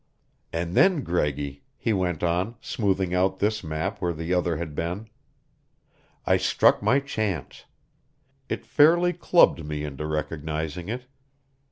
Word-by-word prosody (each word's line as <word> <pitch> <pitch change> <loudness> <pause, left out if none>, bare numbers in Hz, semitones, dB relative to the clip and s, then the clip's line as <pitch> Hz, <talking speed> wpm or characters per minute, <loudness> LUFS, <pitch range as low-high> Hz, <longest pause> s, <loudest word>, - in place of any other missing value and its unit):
"And 85 +1 -3
then, 175 - +4
Greggy," 75 -5 -2 0.2
he 115 -2 0
went 90 -5 -1
on, 90 +7 0
smoothing 95 -4 -1
out 95 +1 +2
this 105 0 0
map 80 +6 -3
where 90 -2 0
the 80 +3 -3
other 90 -3 +1
had 80 -2 -5
been, 90 +8 -3 1.2
"I - - +4
struck - - +3
my 135 - +3
chance. 110 - -4 0.8
It - - -3
fairly 175 +4 +4
clubbed 170 - +4
me 75 0 -4
into 75 +1 -5
recognizing 80 +2 -3
it. 125 +2 -4
90 Hz, 135 wpm, -25 LUFS, 80-110 Hz, 1.2 s, then